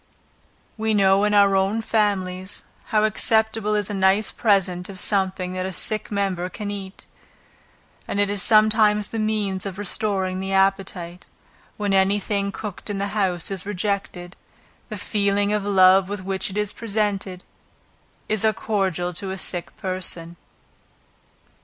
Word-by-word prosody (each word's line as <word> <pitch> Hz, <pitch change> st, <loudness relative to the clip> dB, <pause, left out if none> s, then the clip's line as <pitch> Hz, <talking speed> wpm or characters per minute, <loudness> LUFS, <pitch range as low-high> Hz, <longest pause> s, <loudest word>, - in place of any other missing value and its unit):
We 220 Hz, 0 st, +1 dB
know 195 Hz, 0 st, +4 dB
in 210 Hz, 0 st, +2 dB
our 200 Hz, -1 st, +5 dB
own 195 Hz, +4 st, +1 dB
families, 190 Hz, -4 st, -1 dB, 0.2 s
how 215 Hz, -2 st, +1 dB
acceptable 220 Hz, 0 st, +1 dB
is 205 Hz, -2 st, 0 dB
a -, -, -4 dB
nice 195 Hz, +2 st, +2 dB
present 195 Hz, -5 st, +1 dB
of 195 Hz, -, -8 dB
something 190 Hz, -2 st, 0 dB
that 185 Hz, 0 st, -2 dB
a -, -, -4 dB
sick 215 Hz, +3 st, -1 dB
member 195 Hz, -3 st, -1 dB
can 205 Hz, +1 st, -5 dB
eat; 195 Hz, -1 st, -8 dB, 1.0 s
and 200 Hz, -, -2 dB
it 205 Hz, -, +3 dB
is 200 Hz, -1 st, -1 dB
sometimes 215 Hz, -1 st, +4 dB
the 225 Hz, -, -4 dB
means 210 Hz, -3 st, -1 dB
of 195 Hz, -2 st, -6 dB
restoring 195 Hz, -2 st, -1 dB
the 190 Hz, 0 st, -3 dB
appetite, 190 Hz, -2 st, 0 dB, 0.5 s
when 205 Hz, -2 st, -1 dB
any 195 Hz, +1 st, +3 dB
thing 200 Hz, 0 st, -2 dB
cooked 205 Hz, -1 st, -7 dB
in 205 Hz, -, -2 dB
the 200 Hz, +1 st, -2 dB
house 190 Hz, -4 st, -1 dB
is 190 Hz, -1 st, -1 dB
rejected. 195 Hz, -2 st, -3 dB, 0.5 s
The -, -, -5 dB
feeling 200 Hz, -1 st, 0 dB
of 210 Hz, -1 st, 0 dB
love 190 Hz, -1 st, +5 dB
with 205 Hz, -2 st, -4 dB
which 190 Hz, +1 st, -3 dB
it 195 Hz, -, -6 dB
is 210 Hz, -1 st, -1 dB
presented, 205 Hz, -4 st, -2 dB, 0.8 s
is 215 Hz, -1 st, 0 dB
as 220 Hz, -, +5 dB
a -, -, -1 dB
cordial 190 Hz, -4 st, -1 dB
to 195 Hz, +3 st, -4 dB
a 190 Hz, -, -4 dB
sick 175 Hz, -2 st, -3 dB
person. 180 Hz, -3 st, -4 dB
195 Hz, 155 wpm, -23 LUFS, 190-210 Hz, 1.0 s, our